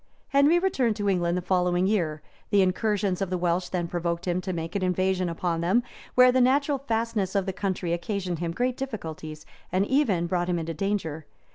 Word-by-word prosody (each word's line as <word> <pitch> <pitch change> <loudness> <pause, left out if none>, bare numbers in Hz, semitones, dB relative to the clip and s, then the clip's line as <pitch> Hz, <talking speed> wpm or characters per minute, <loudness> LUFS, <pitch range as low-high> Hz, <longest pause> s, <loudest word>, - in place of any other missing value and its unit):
Henry 285 +4 +5
returned 270 - +1
to 205 0 -2
England 175 -2 +1
the 180 - -3
following 180 0 +2
year: 170 -7 0 0.3
the 200 -1 +4
incursions 195 0 0
of 195 - -1
the 185 - -1
Welsh 175 +1 0
then 175 -2 -2
provoked 170 0 -2
him 180 +1 0
to 185 - -4
make 165 0 -4
an 200 - 0
invasion 185 0 +1
upon 165 0 -2
them; 190 +8 +2 0.3
where 250 0 +7
the 255 0 +3
natural 280 +2 +3
fastnesses 225 -6 -1
of 195 -2 +2
the 190 - -2
country 185 -3 -2
occasioned 180 -1 -3
him 170 -1 -2
great 250 +7 -1
difficulties, 160 - -6 0.3
and 185 +2 +2
even 215 - +2
brought 175 0 -1
him 175 - +1
into 165 0 -3
danger. 165 -4 -2
185 Hz, 195 wpm, -26 LUFS, 175-215 Hz, 0.3 s, where